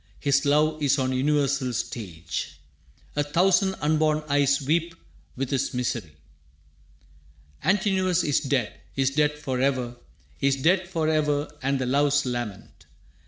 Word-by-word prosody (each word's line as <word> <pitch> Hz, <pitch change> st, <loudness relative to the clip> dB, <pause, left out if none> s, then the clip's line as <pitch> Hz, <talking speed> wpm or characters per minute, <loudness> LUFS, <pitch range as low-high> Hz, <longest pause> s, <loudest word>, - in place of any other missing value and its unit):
His 140 Hz, -1 st, +2 dB
love 155 Hz, +2 st, +2 dB
is 140 Hz, -1 st, +3 dB
on 130 Hz, -1 st, 0 dB
a -, -, -1 dB
universal 140 Hz, -1 st, +1 dB
stage. 90 Hz, -, -5 dB, 0.6 s
A 145 Hz, -, +2 dB
thousand 185 Hz, +6 st, +2 dB
unborn 155 Hz, 0 st, +2 dB
eyes 140 Hz, -1 st, +3 dB
weep 165 Hz, +4 st, 0 dB, 0.4 s
with 135 Hz, +1 st, -3 dB
his 135 Hz, -1 st, -1 dB
misery. 115 Hz, -10 st, -3 dB, 1.5 s
Antinous 190 Hz, -3 st, +2 dB
is 145 Hz, -, +2 dB
dead, 135 Hz, -6 st, -1 dB, 0.2 s
is 135 Hz, -1 st, +1 dB
dead 150 Hz, +1 st, +1 dB
forever, 130 Hz, -3 st, -1 dB, 0.4 s
Is 140 Hz, 0 st, +2 dB
dead 180 Hz, +7 st, +2 dB
forever 155 Hz, -4 st, 0 dB
and 135 Hz, +1 st, 0 dB
the 130 Hz, -, -2 dB
loves 145 Hz, +2 st, +2 dB
lament. 120 Hz, -5 st, -6 dB
145 Hz, 125 wpm, -25 LUFS, 130-155 Hz, 1.5 s, is